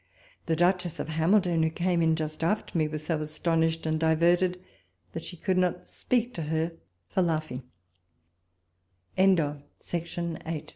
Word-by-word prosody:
The 165 Hz, -, +2 dB
Duchess 175 Hz, 0 st, +1 dB
of -, -, -3 dB
Hamilton, 170 Hz, +2 st, +3 dB
who 160 Hz, -, +3 dB
came 175 Hz, +1 st, 0 dB
in 160 Hz, -1 st, +3 dB
just 155 Hz, 0 st, -4 dB
after 210 Hz, +4 st, 0 dB
me, 155 Hz, -2 st, +2 dB
was 155 Hz, 0 st, -5 dB
so 160 Hz, -2 st, 0 dB
astonished 160 Hz, +1 st, 0 dB
and 155 Hz, 0 st, 0 dB
diverted, 175 Hz, +3 st, +3 dB, 0.5 s
that -, -, -4 dB
she 175 Hz, -, -9 dB
could 185 Hz, +1 st, +1 dB
not 180 Hz, 0 st, 0 dB
speak 245 Hz, 0 st, -1 dB
to 170 Hz, -, -4 dB
her 160 Hz, +2 st, -1 dB, 0.4 s
for 185 Hz, -, 0 dB
lau 165 Hz, -3 st, +2 dB
165 Hz, 135 wpm, -28 LUFS, 160-180 Hz, 0.5 s, Hamilton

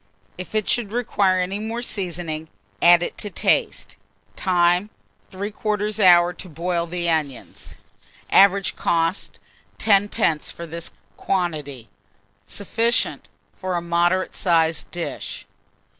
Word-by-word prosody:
If 185 Hz, +4 st, -8 dB
it 215 Hz, -2 st, 0 dB
should 230 Hz, -4 st, +1 dB
require 205 Hz, -5 st, +1 dB
any 185 Hz, +3 st, -2 dB
more 225 Hz, +2 st, -4 dB
seasoning, 175 Hz, -7 st, -3 dB, 0.3 s
add 175 Hz, 0 st, +6 dB
it -, -, -5 dB
to 205 Hz, -, -3 dB
taste. -, -, 0 dB, 0.4 s
Time. 180 Hz, +1 st, +2 dB, 0.4 s
3/4 210 Hz, +2 st, -3 dB
hour 175 Hz, -2 st, +6 dB
to 180 Hz, -, -10 dB
boil 170 Hz, +2 st, -2 dB
the 170 Hz, 0 st, -3 dB
onions. 150 Hz, -6 st, -3 dB, 0.6 s
Average 195 Hz, 0 st, +5 dB
cost, 165 Hz, +2 st, -1 dB, 0.4 s
10d. 200 Hz, -7 st, +1 dB
for 170 Hz, -, -8 dB
this 170 Hz, 0 st, -6 dB, 0.3 s
quantity. 150 Hz, -10 st, -3 dB, 0.6 s
Sufficient 230 Hz, +4 st, -1 dB, 0.3 s
for 185 Hz, -1 st, -3 dB
a 170 Hz, -, -1 dB
moderate 175 Hz, +2 st, +1 dB
sized 165 Hz, -3 st, +1 dB
dish. 175 Hz, -1 st, -6 dB
180 Hz, 115 wpm, -22 LUFS, 170-200 Hz, 0.6 s, add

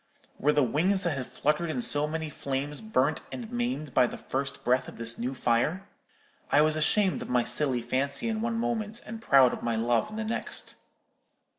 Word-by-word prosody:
Were 150 Hz, -, +3 dB
the 150 Hz, -1 st, +3 dB
wings 180 Hz, -, +1 dB
that 170 Hz, -4 st, 0 dB
had 130 Hz, -2 st, -4 dB
fluttered 150 Hz, +3 st, 0 dB
in 205 Hz, -, -2 dB
so 150 Hz, -10 st, +5 dB
many 160 Hz, 0 st, -4 dB
flames 140 Hz, +1 st, -4 dB
burnt 155 Hz, -9 st, +1 dB
and 235 Hz, -2 st, -7 dB
maimed 240 Hz, -, -2 dB
by 125 Hz, -, +5 dB
the -, -, -7 dB
first 140 Hz, +1 st, -4 dB
breath 125 Hz, +1 st, +2 dB
of -, -, -10 dB
this 115 Hz, 0 st, -4 dB
new 125 Hz, +3 st, -2 dB
fire? 130 Hz, +11 st, 0 dB, 0.6 s
I 145 Hz, -, +6 dB
was 155 Hz, 0 st, +2 dB
ashamed 185 Hz, +5 st, +2 dB
of -, -, -7 dB
my 125 Hz, -1 st, +2 dB
silly 130 Hz, -4 st, 0 dB
fancy 140 Hz, -, -1 dB
in 220 Hz, -1 st, -1 dB
one 230 Hz, 0 st, -1 dB
moment, 230 Hz, -1 st, -2 dB
and 225 Hz, +1 st, -7 dB
proud 135 Hz, -, +5 dB
of -, -, -6 dB
my 115 Hz, -1 st, -1 dB
love 115 Hz, 0 st, +1 dB
in 215 Hz, -, -8 dB
the 220 Hz, -, -2 dB
next. 225 Hz, -, -3 dB
150 Hz, 200 wpm, -28 LUFS, 130-210 Hz, 0.6 s, I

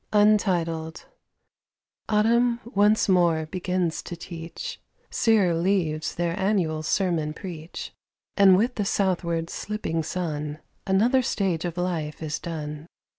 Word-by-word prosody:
Autumn 235 Hz, +3 st, +3 dB
once 210 Hz, -1 st, +3 dB
more 170 Hz, -4 st, +3 dB
begins 180 Hz, 0 st, -1 dB
to 175 Hz, -, -7 dB
teach; 165 Hz, -1 st, -7 dB, 0.3 s
Sere 210 Hz, -6 st, +3 dB
leaves 165 Hz, -3 st, 0 dB
their 170 Hz, -1 st, -1 dB
annual 185 Hz, -6 st, +1 dB
sermon 165 Hz, -2 st, 0 dB
preach; 170 Hz, -3 st, -7 dB, 0.4 s
And 195 Hz, -2 st, +7 dB
with 235 Hz, +5 st, +1 dB
the 210 Hz, -, +1 dB
southward 170 Hz, -4 st, 0 dB
slipping 205 Hz, -6 st, -3 dB
sun 150 Hz, -3 st, -3 dB, 0.3 s
Another 230 Hz, +8 st, +4 dB
stage 190 Hz, -8 st, -1 dB
of 175 Hz, -1 st, -4 dB
life 165 Hz, -4 st, -2 dB
is 150 Hz, -1 st, -3 dB
done. 150 Hz, -2 st, -6 dB
175 Hz, 110 wpm, -25 LUFS, 160-200 Hz, 0.4 s, And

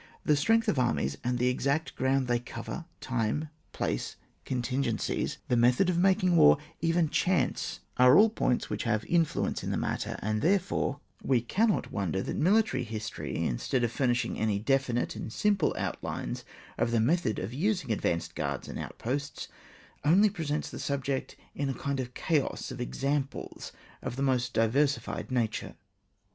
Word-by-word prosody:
The 150 Hz, -, +4 dB
strength 225 Hz, +10 st, +3 dB
of 155 Hz, -10 st, +2 dB
armies 75 Hz, -, +1 dB
and 125 Hz, 0 st, 0 dB
the 125 Hz, +1 st, +2 dB
extent 140 Hz, +5 st, 0 dB
of -, -, -29 dB
groimd 130 Hz, 0 st, +1 dB
they 120 Hz, -1 st, +1 dB
cover, 120 Hz, +7 st, -7 dB, 0.2 s
time, 130 Hz, +5 st, -1 dB, 0.2 s
place, -, -, -2 dB, 0.3 s
contin 130 Hz, +1 st, -1 dB
gencies, 115 Hz, -4 st, -1 dB
the 125 Hz, -, +2 dB
method 125 Hz, +10 st, +4 dB
of 170 Hz, -, -1 dB
making 185 Hz, -1 st, +3 dB
war, 75 Hz, -, +7 dB, 0.2 s
even 165 Hz, +1 st, +2 dB
• -, -, -12 dB
chance, 185 Hz, -1 st, 0 dB, 0.2 s
are 125 Hz, +2 st, +7 dB
all 215 Hz, +1 st, +6 dB
points 125 Hz, -, 0 dB
which -, -, -3 dB
have 110 Hz, -2 st, +1 dB
an -, -, -15 dB
in 170 Hz, -1 st, +4 dB
fluence -, -, -2 dB
in -, -, -4 dB
the -, -, 0 dB
matter; -, -, -2 dB
and, 110 Hz, +1 st, 0 dB
therefore, 180 Hz, -5 st, +1 dB, 0.2 s
we 130 Hz, -3 st, +2 dB
cannot 200 Hz, -, +1 dB
wonder 95 Hz, -1 st, -1 dB
that -, -, -3 dB
military 210 Hz, -, +3 dB
history, 110 Hz, -2 st, -5 dB
in -, -, -1 dB
stead 125 Hz, -2 st, 0 dB
of 120 Hz, -, +1 dB
furnishing 120 Hz, -3 st, 0 dB
any 110 Hz, -2 st, +1 dB
definite 125 Hz, +2 st, 0 dB
and -, -, -6 dB
sim 210 Hz, -, +2 dB
ple 180 Hz, -6 st, 0 dB
outlines -, -, -3 dB, 0.4 s
of 115 Hz, +1 st, +2 dB
the 115 Hz, -1 st, +2 dB
method 135 Hz, -, +2 dB
of 95 Hz, +6 st, -4 dB
using 180 Hz, -, 0 dB
ad 110 Hz, -, -1 dB
vanced 85 Hz, -1 st, -1 dB
guards -, -, -3 dB
and -, -, -6 dB
outposts, 140 Hz, +5 st, -4 dB, 0.5 s
only 195 Hz, +7 st, +5 dB
presents 155 Hz, -5 st, -3 dB
the -, -, -7 dB
subject 140 Hz, -1 st, -2 dB, 0.2 s
in 140 Hz, -1 st, -2 dB
a 135 Hz, -, -2 dB
kind 140 Hz, -1 st, -2 dB
of 125 Hz, -1 st, -5 dB
chaos 155 Hz, -6 st, -1 dB
of 125 Hz, -1 st, -6 dB
exam 135 Hz, +3 st, 0 dB
ples -, -, -9 dB, 0.3 s
of -, -, -4 dB
the 135 Hz, -, -2 dB
most 125 Hz, -2 st, +1 dB
diversified 135 Hz, +6 st, +1 dB
nature. 120 Hz, -4 st, -1 dB
130 Hz, 180 wpm, -29 LUFS, 120-160 Hz, 0.5 s, war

